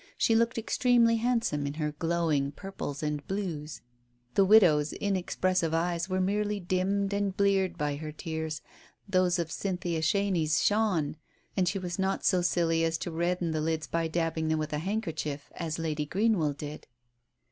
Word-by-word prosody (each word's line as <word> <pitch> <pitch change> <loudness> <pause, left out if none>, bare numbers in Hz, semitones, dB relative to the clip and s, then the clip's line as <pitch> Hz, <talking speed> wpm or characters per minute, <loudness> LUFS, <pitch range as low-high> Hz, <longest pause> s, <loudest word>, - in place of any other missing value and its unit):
She 225 - +3
looked 230 +1 +2
extremely 230 0 +3
handsome 225 -12 0
in 140 - -4
her 150 -1 -1
glowing 155 -3 0
purples 175 -6 -6
and 150 -1 -2
blues. 170 -7 -4 0.5
The 195 - +5
widow's 175 -8 +5
in 200 -1 -1
expressive 185 -2 0
eyes 170 +2 -1
were 185 0 0
merely 205 +2 0
dimmed 195 +2 0
and 200 -1 -1
bleared 195 -3 +2
by 145 -2 -1
her 155 +1 -6
tears, 160 0 -4 0.4
those 185 -2 +2
of 170 -2 -2
Cynthia 180 -4 -2
Chenies 165 -3 +1
shone, 195 -9 +1 0.4
and 185 -2 +2
she 195 - 0
was 180 -1 -4
not 190 0 0
so 185 -3 +4
silly 165 -2 +2
as 165 0 +1
to 175 - -5
redden 170 +1 0
the 155 -1 -1
lids 160 0 -1
by 165 +1 -1
dabbing 160 -1 -1
them 160 0 +1
with 155 -1 -3
a 150 - 0
handkerchief, 160 -7 -3
as 165 -2 -4
Lady 155 -2 -2
Green 210 +4 +2
well 150 -2 +1
did. 150 +1 -8
170 Hz, 170 wpm, -29 LUFS, 155-195 Hz, 0.5 s, The